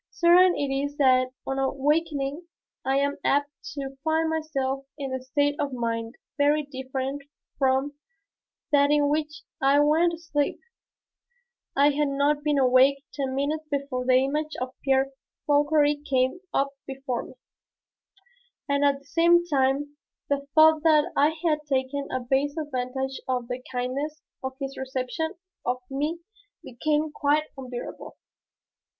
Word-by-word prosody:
Certain 350 +1 +5
it 280 -1 -1
is 285 +1 -2
that 255 -2 +4 0.2
on 270 0 -2
awakening 290 +3 0 0.4
I 270 +1 +1
am 280 +1 0
apt 285 +1 +2 0.2
to 270 -1 -5
find 320 0 +1
myself 275 -4 -2
in 275 -3 -4
a 260 - -3
state 285 +3 +1
of 280 -2 -1
mind 230 0 -3 0.2
very 295 +1 +3
different 265 0 -4 0.4
from 265 +1 +2 0.8
that 285 -1 +5
in 295 -1 +3
which 300 0 -2 0.2
I 275 +2 +4
went 320 +4 +3
to - - -5
sleep. 295 -3 -1 1.2
I 285 +2 +5
had 295 +1 +1
not 285 +1 +1
been 300 -1 +1
awake 265 +1 +4
ten 270 -2 -2
minutes 305 +3 -1
before 280 -3 -2
the 255 0 +3
image 300 +4 +1
of 255 0 -4
Pierre 270 0 +2 0.3
Fauchery 295 0 +3
came 260 +5 +1
up 275 -1 +1 0.2
before 265 -2 -3
me, - - -11 1.3
and 280 0 +1
at 280 -1 +3
the 275 - -21
same 340 +3 +4
time 285 -1 0 0.3
the 280 0 -1
thought 315 0 +7
that 310 -2 +4
I 290 +2 +5 0.2
had 305 -2 +3
taken 270 +1 -1
a 255 - -2
base 275 +4 0
advantage 265 -2 -3
of 250 -2 -1
the 250 +1 -4
kindness 265 +5 -3 0.2
of 265 0 -3
his 275 0 -5
reception 265 +6 -3 0.3
of 250 +1 0
me 300 +5 -2 0.4
became 300 +5 -1
quite 295 +1 +2
unbearable. 255 -3 -7
280 Hz, 145 wpm, -26 LUFS, 265-300 Hz, 1.3 s, thought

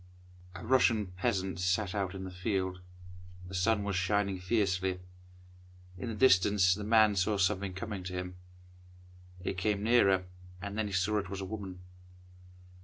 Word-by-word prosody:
A - - -8
RUSSIAN 110 -5 +3
peasant 95 -1 -1
sat 95 +2 0
out 100 -2 -2
in 95 - -6
the 95 - -6
field. 95 0 -2 0.7
The 95 - -10
sun 100 +3 +1
was 100 -2 -2
shining 95 +1 0
fiercely. 95 -2 0 1.0
In 115 +6 -5
the 110 - -4
distance 100 -5 +5
the 105 +3 -5
man 110 -1 +4
saw 100 +2 +1
something 95 -1 0
coming 100 -1 -5
to 90 - -5
him. 90 0 -5 1.1
It 90 - -3
came 105 +1 0
nearer, 100 -5 +4 0.4
and 100 +1 -6
then 110 -1 -1
he - - -6
saw 105 +3 +1
it 100 -2 -6
was 100 0 -5
a - - -4
woman. 95 -3 -7
95 Hz, 160 wpm, -31 LUFS, 90-105 Hz, 1.1 s, distance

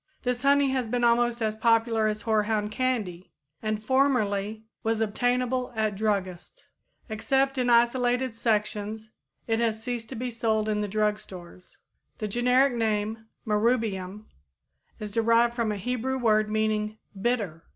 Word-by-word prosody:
This 250 -1 -1
honey 280 0 +4
has 260 -3 -1
been 245 +2 -1
almost 240 0 +2
as 215 -1 0
popular 225 -1 +2
as 210 -1 -2
hoarhound 215 -1 0
candy, 215 -8 -2 0.3
and 215 -1 -2
formerly 220 -5 +1 0.2
was 225 -1 0
obtainable 245 +3 0
at 215 -1 0
druggists. 200 - -3 0.4
Except 270 +5 0
in 250 -1 +1
isolated 245 +1 +2
sections, 215 -1 -2 0.3
it 225 -1 0
has 225 -1 0
ceased 240 -2 -4
to 265 - -6
be 245 +2 -3
sold 220 -2 0
in 210 -1 0
the 210 - -1
drug 210 +1 0
stores. 180 -3 -12 0.4
The 215 - -3
generic 250 +5 +3
name 220 -1 -1 0.2
Marrubium 210 -3 0 0.7
is 210 -1 -6
derived 230 +2 +3
from 235 -3 -1
a 210 - -3
Hebrew 250 +5 -2
word 215 -3 +2
meaning 215 0 0 0.2
bitter. 205 -9 -1
225 Hz, 140 wpm, -27 LUFS, 210-245 Hz, 0.7 s, honey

